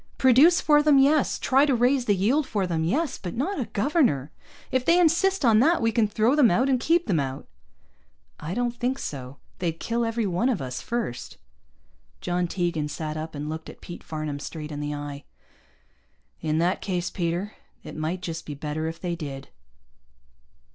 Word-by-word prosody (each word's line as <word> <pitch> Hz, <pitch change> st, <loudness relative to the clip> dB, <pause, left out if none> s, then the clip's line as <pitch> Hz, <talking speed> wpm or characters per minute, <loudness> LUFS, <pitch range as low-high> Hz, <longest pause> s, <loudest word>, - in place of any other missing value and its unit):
Produce 270 Hz, +7 st, +6 dB
for 295 Hz, -1 st, +5 dB
them, 295 Hz, -2 st, +5 dB
yes. 280 Hz, +2 st, +3 dB
Try 270 Hz, +2 st, +3 dB
to 280 Hz, -3 st, +3 dB
raise 250 Hz, +2 st, +2 dB
the 205 Hz, -, +3 dB
yield 255 Hz, +10 st, +1 dB
for 200 Hz, -3 st, -1 dB
them, 165 Hz, -3 st, -1 dB
yes. 280 Hz, -, -1 dB
But 180 Hz, -3 st, -6 dB
not 300 Hz, +9 st, -2 dB
a 250 Hz, -, -1 dB
governor. 205 Hz, -, +1 dB, 0.4 s
If 260 Hz, -1 st, +1 dB
they 335 Hz, +6 st, +4 dB
insist 355 Hz, +1 st, +3 dB
on 220 Hz, -2 st, +5 dB
that 325 Hz, +8 st, +4 dB
we 225 Hz, 0 st, +1 dB
can 225 Hz, -2 st, +2 dB
throw 220 Hz, +4 st, +2 dB
them 285 Hz, -6 st, +5 dB
out, 255 Hz, +10 st, +2 dB
and 260 Hz, -2 st, +2 dB
keep 340 Hz, +6 st, +2 dB
them 180 Hz, -7 st, +1 dB
out." 135 Hz, -1 st, -4 dB, 0.9 s
"I 165 Hz, +5 st, -5 dB
don't 245 Hz, 0 st, -1 dB
think 250 Hz, +2 st, -1 dB
so. 135 Hz, -, -6 dB, 0.2 s
They'd 165 Hz, -2 st, -2 dB
kill 235 Hz, +1 st, -1 dB
every 230 Hz, -1 st, -1 dB
one 195 Hz, +7 st, +1 dB
of 240 Hz, -, 0 dB
us 130 Hz, -1 st, -5 dB
first." 230 Hz, -, -4 dB, 0.8 s
John 175 Hz, 0 st, -1 dB
Tegan 170 Hz, -4 st, -1 dB
sat 155 Hz, +1 st, -5 dB
up, 155 Hz, 0 st, -6 dB
and 145 Hz, +1 st, -5 dB
looked 160 Hz, +1 st, -6 dB
Pete 175 Hz, -, -10 dB
Farnam 155 Hz, -2 st, -4 dB
straight 155 Hz, 0 st, -7 dB
in 145 Hz, -, -5 dB
the 150 Hz, 0 st, -3 dB
eye. 145 Hz, -1 st, -7 dB, 1.2 s
"In 155 Hz, -1 st, 0 dB
that 175 Hz, +3 st, +1 dB
case, 180 Hz, -2 st, -2 dB
Peter, 175 Hz, +3 st, -2 dB, 0.3 s
it -, -, -9 dB
might 165 Hz, +4 st, -3 dB
just 165 Hz, -2 st, -5 dB
be 145 Hz, -, -5 dB
better 150 Hz, +2 st, -3 dB
if 165 Hz, +1 st, -6 dB
they 175 Hz, -2 st, -3 dB
did." 140 Hz, -4 st, -7 dB
190 Hz, 190 wpm, -25 LUFS, 155-255 Hz, 1.2 s, Produce